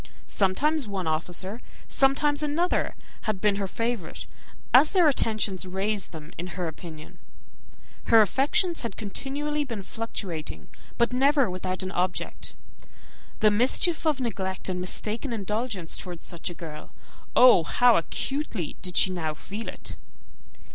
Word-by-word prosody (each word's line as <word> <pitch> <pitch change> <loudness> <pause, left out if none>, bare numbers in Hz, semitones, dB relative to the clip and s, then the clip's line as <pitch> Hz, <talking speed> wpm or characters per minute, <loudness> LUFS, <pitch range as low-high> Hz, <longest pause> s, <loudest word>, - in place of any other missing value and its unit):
Sometimes 265 +9 +1
one 195 -3 -3
officer, 175 +7 -1 0.3
sometimes 285 +2 +3
another, 305 +4 0 0.3
had 210 -3 0
been 205 0 +2
her 200 -1 -1
favourite, 230 -3 -3 0.5
as 275 +5 +8
their 360 -4 +6
attentions 215 -8 0
raised 195 +2 -1
them 160 -1 -10
in 175 - -3
her 180 -2 -1
opinion. 160 -1 -9 0.9
Her 225 - +7
affections 315 - +2
had 230 -5 -4
been 210 - -5
continually 295 +4 -2
fluctuating, 195 - -5 0.3
but 235 +1 +2
never 275 -3 +4
without 185 0 -3
an 185 - -4
object. 180 -1 -2 0.9
The 215 -1 +6
mischief 290 - +2
of 300 -3 +2
neglect 190 -6 -2
and 180 -1 -2
mistaken 220 +7 -3
indulgence 210 -3 -2
towards 175 -2 -7
such 170 0 -4
a 175 - -8
girl 155 -3 -9 0.4
oh! 250 -9 +8
how 245 +7 +5
acutely 220 - -2
did 180 -1 -2
she 190 - +5
now 160 -4 -2
feel 210 +7 -7
it! - - -7
210 Hz, 135 wpm, -27 LUFS, 180-265 Hz, 0.9 s, as